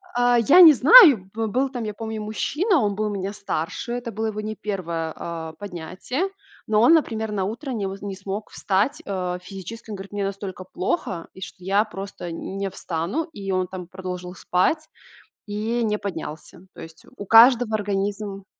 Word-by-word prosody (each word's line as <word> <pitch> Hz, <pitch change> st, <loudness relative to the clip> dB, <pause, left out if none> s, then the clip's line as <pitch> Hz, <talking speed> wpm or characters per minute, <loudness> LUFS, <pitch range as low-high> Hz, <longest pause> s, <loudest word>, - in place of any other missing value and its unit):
А, 245 Hz, 0 st, +4 dB
я 305 Hz, -, +7 dB
не 320 Hz, -3 st, +11 dB
знаю, 280 Hz, -, +8 dB
бы 225 Hz, 0 st, -2 dB
был 260 Hz, +5 st, 0 dB
там, 245 Hz, -3 st, -5 dB
я 210 Hz, -, -4 dB
помню, 220 Hz, 0 st, -5 dB
мужчина, 300 Hz, -, 0 dB
он 205 Hz, -2 st, 0 dB
был 215 Hz, 0 st, -1 dB
меня 200 Hz, 0 st, -3 dB
старше, 200 Hz, +3 st, -4 dB
это 245 Hz, -1 st, -4 dB
было 220 Hz, +2 st, -2 dB
его 215 Hz, 0 st, -3 dB
не 215 Hz, 0 st, -5 dB
1, 170 Hz, -6 st, -3 dB
а, 165 Hz, -1 st, -6 dB
поднятие, 200 Hz, -, -4 dB, 0.4 s
но 215 Hz, 0 st, +3 dB
он, 285 Hz, +8 st, +7 dB
например, 220 Hz, -9 st, +1 dB
на 195 Hz, -2 st, -1 dB
утро 255 Hz, +7 st, -5 dB
не 210 Hz, -5 st, -2 dB
м 190 Hz, 0 st, -4 dB
не 200 Hz, -1 st, -5 dB
смог 195 Hz, +2 st, -6 dB
встать, 205 Hz, +9 st, 0 dB
э, 180 Hz, -2 st, -3 dB
физически. 195 Hz, +5 st, -9 dB
Он -, -, -4 dB
говорит: 195 Hz, +1 st, -10 dB
"Мне 205 Hz, -1 st, -2 dB
настолько 195 Hz, -2 st, -5 dB
плохо, 180 Hz, -1 st, -3 dB
и 190 Hz, -, -13 dB
что 185 Hz, -, -9 dB
я 200 Hz, +3 st, +3 dB
просто 195 Hz, -4 st, -7 dB
н 190 Hz, +3 st, -6 dB
не 195 Hz, -1 st, -2 dB
встану". 180 Hz, -, -3 dB
И 195 Hz, -1 st, -5 dB
он 185 Hz, -1 st, 0 dB
там 185 Hz, -1 st, -7 dB
продолжил 180 Hz, -1 st, -7 dB
спать 250 Hz, -, 0 dB, 0.6 s
и 220 Hz, +3 st, -2 dB
не 210 Hz, -1 st, 0 dB
поднялся. 170 Hz, -1 st, -7 dB
То -, -, -15 dB
есть, 165 Hz, 0 st, -12 dB
у 200 Hz, -, -7 dB
каждого 230 Hz, +1 st, +6 dB
организм 200 Hz, -1 st, -3 dB
205 Hz, 185 wpm, -23 LUFS, 185-225 Hz, 0.6 s, не